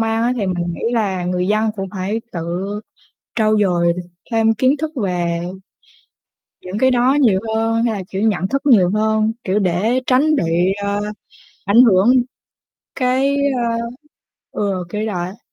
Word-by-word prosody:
mang 225 0 0
á. 240 +1 +2
Thì 205 -5 -1
mình 175 -2 -2
nghĩ - - -9
là 195 -6 0
người 180 0 -1
dân 215 +1 +2
cũng 195 -1 -4
phải 200 +3 -3
tự 175 +3 -3 0.7
trau 215 -1 +2
dồi 175 -4 +2 0.4
thêm 225 0 +3
kiến 260 +6 +2
thức 310 +2 -3
về 175 -2 -1 1.2
những 185 +3 -5
cái 260 +3 +3
đó 250 +1 +3
nhiều 210 -8 +4 0.2
hơn, 225 +1 +1
hay 235 -2 +1
là, 195 -3 -4
kiểu, 195 - -3
nhận 205 -4 +1
thức 275 +6 -1
nhiều 210 -11 +5
hơn, 220 0 +1
kiểu, 195 +2 0
để 200 +7 +1
tránh 285 +5 +3
bị, 175 - +1
ơ, 200 0 -1 0.6
ảnh 215 +5 +6
hưởng 205 +2 +5 0.8
cái, 265 +2 +1 1.2
ơ - - -4
ừ, 190 -3 -1
kiểu 210 +3 -3
vậy 180 -5 -2
á. 190 +4 -14
210 Hz, 160 wpm, -19 LUFS, 185-230 Hz, 1.2 s, ảnh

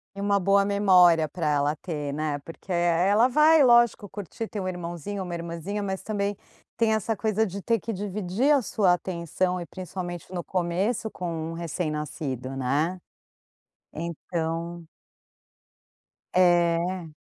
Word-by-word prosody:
E 200 - -6
uma 200 0 +2
boa 195 +1 +3
memória 180 -5 +5
para 165 0 -3
ela 145 0 +1
ter, 150 -3 -4
né, 150 -1 -2
porque, 165 +6 -11
eh, 175 0 +2
ela 220 +4 +5
vai, 305 +3 +5
lógico, 235 -4 +4
curtir, 205 +3 -6
ter 210 - -5
um 185 - -3
irmãozinho, 180 +2 -4
uma 180 -1 -6
irmãzinha, 170 +5 -4
mas 190 -1 -3
também 205 -1 -2 0.4
tem 225 -1 +2
essa 220 +1 0
coisa 220 +1 +1
de 200 0 -6
ter 230 +3 +1
que 230 - -4
dividir 205 +6 -1
a 285 -2 +5
sua 200 -5 +2
atenção 180 +1 -2
e - - -5
principalmente 180 -1 -7
no 175 -1 -3
começo 190 +7 -1
com 165 -2 -4
um - - -5
recém-nascido, 150 -5 -4
né. 145 +8 0 0.9
Então 170 +1 -4 1.5
É. 175 0 +3
180 Hz, 145 wpm, -26 LUFS, 165-205 Hz, 1.5 s, memória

